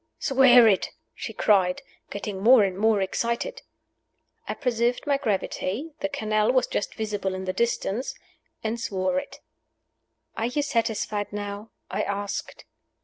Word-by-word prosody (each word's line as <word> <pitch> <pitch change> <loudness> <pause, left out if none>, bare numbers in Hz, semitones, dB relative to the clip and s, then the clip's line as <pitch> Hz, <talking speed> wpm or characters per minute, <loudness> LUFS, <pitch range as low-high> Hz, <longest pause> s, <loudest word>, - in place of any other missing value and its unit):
"Swear 250 -3 +6
it!" 195 -3 +2 0.2
she - - -6
cried, 190 +3 +2 0.3
getting 200 -1 -5
more 235 +1 +7
and 190 -2 0
more 215 +1 +2
excited. 235 - -2 0.9
I - - -3
preserved 245 -1 0
my 285 -2 +2
gravity 220 - -2
(the 295 - -1
canal 215 -5 +1
was 255 -1 +3
just 205 - -3
visible 205 -3 -2
in 190 0 -5
the 185 - -2
distance), 235 +1 -1 0.5
and 225 +1 -2
swore 195 +4 0
it. 280 - -10 0.9
"Are 225 - -1
you 285 +4 -1
satisfied 220 -5 -1
now?" 205 +1 -5 0.2
I - - -1
asked. 200 0 -4
220 Hz, 140 wpm, -25 LUFS, 200-250 Hz, 0.9 s, more